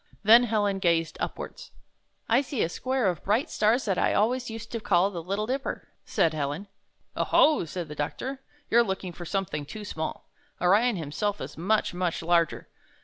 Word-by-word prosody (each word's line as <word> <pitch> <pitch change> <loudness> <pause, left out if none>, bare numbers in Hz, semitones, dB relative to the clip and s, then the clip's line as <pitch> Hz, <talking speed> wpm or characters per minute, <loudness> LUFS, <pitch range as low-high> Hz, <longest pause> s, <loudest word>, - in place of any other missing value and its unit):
Then 230 +4 +8
Helen 205 -3 0
gazed 165 -3 +1
upwards. - - -5 0.6
'T 235 +4 +4
see 270 -3 -2
a 165 - 0
square 255 +3 -1
of 175 -4 -1
bright 215 +7 +1
stars 225 +5 +2
that 195 -4 0
I - - +2
always 245 +4 +1
used 225 0 -8
to 230 - -3
call 195 -2 +2
the 175 -3 -5
Little 200 +5 -2
Dipper," 270 +4 -3 0.2
said 160 - +2
Helen. 150 +6 -3 0.5
"0 - - -1
ho!" 300 - +4
said 170 +1 -5
the 150 - -7
doctor, 260 - -4 0.3
''you're 235 - +6
looking 190 -4 -4
for 175 - -8
something 175 -5 -2
too 210 +8 -8
small. 160 -5 -5 0.3
Orion 210 +7 +4
himself 185 +6 -2
is - - -7
much, 200 +6 +1
much 175 -2 -2
larger. 170 -1 +1
200 Hz, 180 wpm, -27 LUFS, 170-230 Hz, 0.6 s, Then